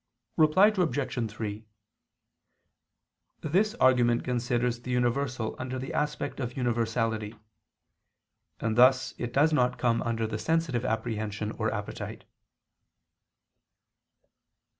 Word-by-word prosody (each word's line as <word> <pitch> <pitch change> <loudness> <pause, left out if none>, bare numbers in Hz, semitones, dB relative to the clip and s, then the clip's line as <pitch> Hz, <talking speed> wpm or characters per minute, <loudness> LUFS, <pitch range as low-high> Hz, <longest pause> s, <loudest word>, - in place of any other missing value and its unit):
Reply 185 +7 +5
Obj. 140 - -1
3: 105 0 -5 1.8
This 200 +9 +1
argument 120 - +3
considers 125 -1 -1
the 125 - -8
universal 125 -1 0
under 130 0 -4
the 130 +1 -5
aspect 145 -2 -2
of 125 -1 -4
universality: 115 -3 -1 1.2
and 110 -1 -1
thus 130 +2 +5
it 120 - -3
does 150 +5 +3
not 125 -4 +2
come 120 -2 +1
under 115 -1 -1
the 110 0 -4
sensitive 160 -6 0
apprehension 110 -1 -2
or 110 -1 -2
appetite. 105 -2 -6
120 Hz, 100 wpm, -28 LUFS, 115-135 Hz, 1.8 s, Reply